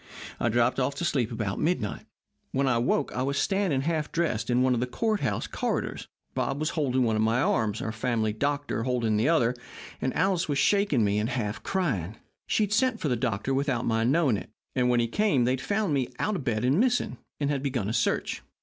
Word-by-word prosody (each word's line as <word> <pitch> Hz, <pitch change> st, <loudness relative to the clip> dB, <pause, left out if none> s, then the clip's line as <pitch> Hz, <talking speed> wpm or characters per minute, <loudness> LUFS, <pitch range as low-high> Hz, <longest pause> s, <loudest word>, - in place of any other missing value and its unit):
I 120 Hz, -, +1 dB
dropped 120 Hz, +3 st, +2 dB
off 135 Hz, +2 st, 0 dB
to 175 Hz, -, -2 dB
sleep 125 Hz, -9 st, 0 dB
about 110 Hz, -4 st, -2 dB
midnight. 155 Hz, -, -1 dB, 0.5 s
When 135 Hz, +1 st, +1 dB
I 125 Hz, -3 st, +3 dB
awoke 130 Hz, +4 st, +1 dB
I 125 Hz, -, -2 dB
was 140 Hz, +2 st, -1 dB
standing 195 Hz, -9 st, +1 dB
half 155 Hz, 0 st, -1 dB
dressed 125 Hz, -11 st, -1 dB
in 125 Hz, +1 st, +3 dB
one 130 Hz, -1 st, +3 dB
of 120 Hz, -, 0 dB
the 125 Hz, -, -1 dB
court 215 Hz, -, 0 dB
house 135 Hz, -, -1 dB
corridors. -, -, -3 dB, 0.3 s
Bob 135 Hz, +1 st, -1 dB
was 155 Hz, +1 st, 0 dB
holding 130 Hz, -5 st, +1 dB
one 115 Hz, -2 st, +1 dB
of 110 Hz, -, +1 dB
my 110 Hz, +2 st, +2 dB
arms, 110 Hz, -4 st, +1 dB
our 110 Hz, -, -2 dB
family 110 Hz, -1 st, -1 dB
doctor 145 Hz, +1 st, -1 dB
the 115 Hz, -1 st, +1 dB
other, 125 Hz, -8 st, +3 dB, 0.5 s
and 130 Hz, -, -1 dB
Alice 190 Hz, -4 st, +1 dB
was 145 Hz, -, +1 dB
shaking 200 Hz, -, +3 dB
me 100 Hz, 0 st, +2 dB
and 110 Hz, +2 st, -1 dB
half 115 Hz, -5 st, -2 dB
crying. 110 Hz, -, -1 dB, 0.3 s
She 215 Hz, -, +2 dB
had 210 Hz, 0 st, -1 dB
sent 230 Hz, 0 st, +2 dB
for 150 Hz, -, -1 dB
the 125 Hz, -, +2 dB
doctor 120 Hz, +1 st, -1 dB
without 135 Hz, -3 st, 0 dB
my 115 Hz, 0 st, +1 dB
knowing 135 Hz, -2 st, +3 dB
it, -, -, -8 dB, 0.3 s
and 125 Hz, -1 st, +2 dB
when 120 Hz, -1 st, +3 dB
he 115 Hz, -, +2 dB
came 165 Hz, -, +2 dB
they 125 Hz, -, +2 dB
had 130 Hz, 0 st, -1 dB
found 200 Hz, +3 st, 0 dB
me 135 Hz, -3 st, +1 dB
out 210 Hz, +8 st, 0 dB
of 155 Hz, -, -3 dB
bed 115 Hz, -1 st, 0 dB
and 135 Hz, +7 st, +3 dB
missing, 245 Hz, +1 st, +1 dB, 0.2 s
and 145 Hz, -1 st, 0 dB
had 140 Hz, -2 st, -1 dB
begun 130 Hz, -7 st, -1 dB
a 110 Hz, -, -2 dB
search. -, -, 0 dB
130 Hz, 225 wpm, -27 LUFS, 115-155 Hz, 0.5 s, I